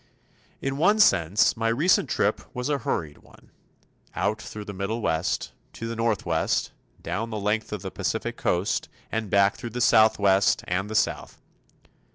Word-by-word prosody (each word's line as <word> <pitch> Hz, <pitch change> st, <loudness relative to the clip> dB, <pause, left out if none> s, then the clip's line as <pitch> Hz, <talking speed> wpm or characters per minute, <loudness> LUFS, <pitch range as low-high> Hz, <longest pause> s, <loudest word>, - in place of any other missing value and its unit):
In 135 Hz, 0 st, -2 dB
one 205 Hz, +8 st, +3 dB
sense 100 Hz, -, +4 dB
my 115 Hz, 0 st, -1 dB
recent 140 Hz, +11 st, +2 dB
trip -, -, +1 dB
was 125 Hz, +2 st, -3 dB
a 145 Hz, -1 st, 0 dB
hurried 75 Hz, -, -3 dB
one, -, -, -21 dB, 0.6 s
out 110 Hz, +1 st, -1 dB
through 105 Hz, 0 st, -8 dB
the 100 Hz, -, -7 dB
Middle 100 Hz, +4 st, -3 dB
West, 80 Hz, -6 st, -1 dB, 0.2 s
to 115 Hz, -, -6 dB
the 115 Hz, -, -4 dB
Northwest, 105 Hz, -8 st, 0 dB, 0.3 s
down 115 Hz, +2 st, -3 dB
the 110 Hz, -, -4 dB
length 105 Hz, +2 st, -1 dB
of 105 Hz, -3 st, -5 dB
the -, -, -5 dB
Pacific -, -, -3 dB
Coast 105 Hz, +4 st, -1 dB, 0.2 s
and 110 Hz, -2 st, -2 dB
back 100 Hz, +1 st, +3 dB
through 120 Hz, -, -6 dB
the 120 Hz, +2 st, -5 dB
Southwest 105 Hz, -4 st, +4 dB
and 95 Hz, +3 st, -1 dB
the 110 Hz, -, -5 dB
South. -, -, -1 dB
110 Hz, 165 wpm, -25 LUFS, 100-115 Hz, 0.6 s, sense